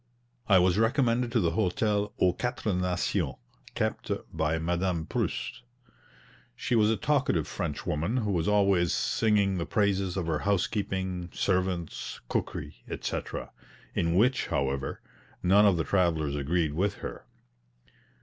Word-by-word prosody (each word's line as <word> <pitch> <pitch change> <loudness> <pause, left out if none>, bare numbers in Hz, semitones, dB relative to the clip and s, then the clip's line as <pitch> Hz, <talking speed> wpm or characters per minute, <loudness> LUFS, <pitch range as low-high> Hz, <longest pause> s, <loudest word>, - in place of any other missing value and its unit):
I 95 - +7
was 90 +2 +3
recommended 120 0 +2
to 120 - +4
the 85 -5 +2
hotel 105 +2 0
"Aux 90 -1 +4
Quatre 120 -2 -2
Nations," 90 0 0 0.4
kept - - -2 0.3
by 80 +1 +1
Madame 85 0 -1
Prust. - - -3 0.9
She - - -2
was 110 -2 +4
a 110 - +2
talkative 135 - +1
French - - -4
woman, 85 +11 -1
who 105 -4 0
was 85 -4 0
always 100 -4 +3
singing 100 -4 +2
the 85 - -3
praises 100 -1 +1
of 90 - -1
her 80 -2 0
housekeeping, 95 -2 -1
servants, 90 -3 -1
cookery, - - -3
etc., - - -4 0.4
in 85 0 +1
which, 125 +7 +3
however, 70 0 -2 0.4
none 100 +3 +6
of 95 -4 +3
the 80 - +1
travellers 80 -7 +1
agreed 75 +2 0
with 95 +6 0
her. - - -7
95 Hz, 135 wpm, -28 LUFS, 85-105 Hz, 0.9 s, I